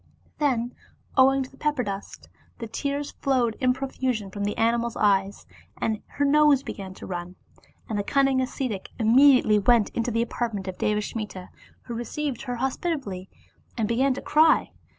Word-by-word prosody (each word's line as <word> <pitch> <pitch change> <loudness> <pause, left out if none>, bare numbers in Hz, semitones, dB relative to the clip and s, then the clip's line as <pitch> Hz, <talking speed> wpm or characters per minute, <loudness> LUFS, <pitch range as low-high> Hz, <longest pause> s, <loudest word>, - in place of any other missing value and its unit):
Then 250 -5 0 0.4
owing 270 0 +5
to 255 - -11
the 270 - -18
pepper 295 -4 0
dust, 200 -1 -7 0.3
the 230 - -5
tears 280 +6 -3
flowed 250 -4 0
in 255 -1 +3
profusion 255 -6 -2
from 200 +1 -3
the 205 - -2
animal's 235 0 +1
eyes, 200 -1 +1 0.3
and 220 -1 -1 0.2
her 285 - +2
nose 290 -1 +5
began 190 -1 -7
to - - -10
run. 180 0 -6 0.5
And 215 -3 -2
the - - -1
cun 275 +5 +2
ning 265 -1 +2
ascetic 255 -5 -3
immediately 245 -1 +5
went 225 +1 +4
into 235 +1 -1
the 230 0 +1
apartment 225 -5 -3
of 185 - -6
Deva 210 0 +1
smita, 210 -4 -6 0.3
who 240 - -7
received 245 +3 -3
her 245 -2 -4
hospitably, 260 - -3 0.5
and 220 -2 0
began 255 +4 +2
to - - -7
cry. 315 +1 +4
235 Hz, 170 wpm, -25 LUFS, 210-270 Hz, 0.5 s, owing